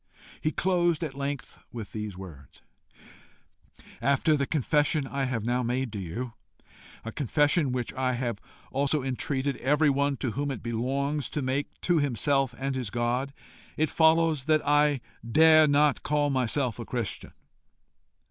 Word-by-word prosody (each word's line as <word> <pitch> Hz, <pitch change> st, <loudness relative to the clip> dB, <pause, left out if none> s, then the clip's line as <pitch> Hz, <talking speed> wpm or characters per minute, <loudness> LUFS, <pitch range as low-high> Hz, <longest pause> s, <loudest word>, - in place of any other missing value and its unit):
He 155 Hz, -, 0 dB
closed 175 Hz, -1 st, +1 dB
at 150 Hz, -4 st, -4 dB
length 140 Hz, 0 st, -5 dB
with 115 Hz, -4 st, -7 dB
these 105 Hz, -3 st, -5 dB
words: 80 Hz, -8 st, -12 dB, 1.4 s
"After 140 Hz, +5 st, +3 dB
the 140 Hz, -2 st, -1 dB
confession 150 Hz, 0 st, +1 dB
I 140 Hz, 0 st, -2 dB
have 120 Hz, -4 st, -2 dB
now 125 Hz, +1 st, +1 dB
made 125 Hz, 0 st, -2 dB
to 105 Hz, -, -4 dB
you, 115 Hz, +7 st, -5 dB, 0.7 s
a 115 Hz, -, -4 dB
confession 145 Hz, +2 st, +1 dB
which 125 Hz, -2 st, -3 dB
I 130 Hz, -1 st, 0 dB
have 120 Hz, -4 st, -2 dB, 0.3 s
also 140 Hz, +1 st, 0 dB
entreated 135 Hz, +1 st, -2 dB
everyone 140 Hz, 0 st, +2 dB
to 130 Hz, -2 st, -2 dB
whom 140 Hz, +5 st, -2 dB
it 135 Hz, -, -5 dB
belongs 135 Hz, +5 st, -1 dB
to 150 Hz, -, -3 dB
make 130 Hz, +2 st, -2 dB
to 175 Hz, -2 st, +2 dB
himself 135 Hz, -1 st, +1 dB
and 135 Hz, +1 st, -2 dB
his 125 Hz, -5 st, -3 dB
God, 120 Hz, +4 st, -1 dB, 0.5 s
it 155 Hz, 0 st, +1 dB
follows 160 Hz, -3 st, +3 dB
that 155 Hz, -1 st, +2 dB
I 145 Hz, -2 st, +3 dB, 0.2 s
dare 155 Hz, +6 st, +6 dB
not 145 Hz, 0 st, +3 dB
call 145 Hz, -1 st, +1 dB
myself 130 Hz, -2 st, 0 dB
a 115 Hz, -, -5 dB
Christian. 120 Hz, -5 st, -4 dB
135 Hz, 150 wpm, -27 LUFS, 120-150 Hz, 1.4 s, dare